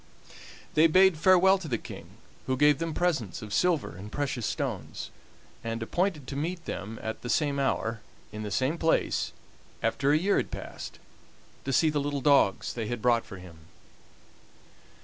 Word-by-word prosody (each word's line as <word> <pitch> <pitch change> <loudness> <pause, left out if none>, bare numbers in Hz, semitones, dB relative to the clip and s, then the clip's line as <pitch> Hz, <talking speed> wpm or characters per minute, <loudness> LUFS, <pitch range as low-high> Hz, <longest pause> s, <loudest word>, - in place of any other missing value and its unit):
They 155 +2 +6
bade 185 +2 +5
farewell 185 +2 +5
to 180 - -7
the 120 -5 0
King, - - -11 0.3
who 130 0 0
gave 145 +1 +5
them 165 -1 -3
presents 135 - -1
of 105 -1 -7
silver 175 - +1
and 100 +3 -9
precious 130 -6 -2
stones, - - -4 0.5
and 115 0 -3
appointed 175 - -1
to 135 - -6
meet 165 +4 -3
them 110 +3 -5
at 110 0 -4
the 120 - -6
same 140 0 +1
hour, 115 -4 -1 0.3
in 105 0 -6
the 105 - -4
same 135 +10 0
place, 160 - +1 0.5
after 140 +1 +2
a 150 - +5
year 195 +5 +2
had - - -1
passed, - - -8 0.7
to 135 - -1
see 155 +4 +4
the 145 -1 0
little 145 0 -2
dogs 140 -9 +3
they 115 -3 -3
had 120 +1 -3
brought 120 0 +2
for 100 - -9
him. 85 -3 -14
140 Hz, 170 wpm, -28 LUFS, 115-165 Hz, 0.7 s, They